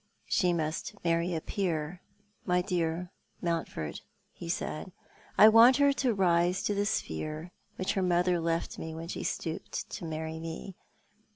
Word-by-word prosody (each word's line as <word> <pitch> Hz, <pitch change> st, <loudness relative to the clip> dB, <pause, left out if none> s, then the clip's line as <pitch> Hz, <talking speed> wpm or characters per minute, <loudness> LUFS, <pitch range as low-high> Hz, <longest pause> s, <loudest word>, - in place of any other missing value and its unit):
"She 180 Hz, -3 st, +2 dB
must 165 Hz, +5 st, -2 dB
marry 170 Hz, +1 st, +1 dB
a 160 Hz, -, -2 dB
peer, 175 Hz, -2 st, -2 dB, 0.4 s
my 180 Hz, 0 st, +2 dB
dear 175 Hz, -1 st, -1 dB, 0.3 s
Monntford," 165 Hz, -, -3 dB, 0.3 s
he 170 Hz, -, -8 dB
said. 170 Hz, +1 st, -3 dB, 0.5 s
"I 215 Hz, -, +10 dB
want 230 Hz, +4 st, +8 dB
her 285 Hz, -1 st, +5 dB
to 255 Hz, -5 st, +1 dB
rise 180 Hz, 0 st, +3 dB
to 205 Hz, -, +1 dB
the 205 Hz, 0 st, 0 dB
sphere 155 Hz, -, -3 dB, 0.2 s
which 185 Hz, -, -1 dB
her 195 Hz, -, 0 dB
mother 180 Hz, -1 st, +2 dB
left 165 Hz, 0 st, -1 dB
when 160 Hz, +1 st, -6 dB
she -, -, -4 dB
stooped 160 Hz, -2 st, -4 dB
to -, -, -5 dB
marry 160 Hz, 0 st, -4 dB
me. 165 Hz, +3 st, -6 dB
175 Hz, 150 wpm, -30 LUFS, 160-185 Hz, 0.5 s, I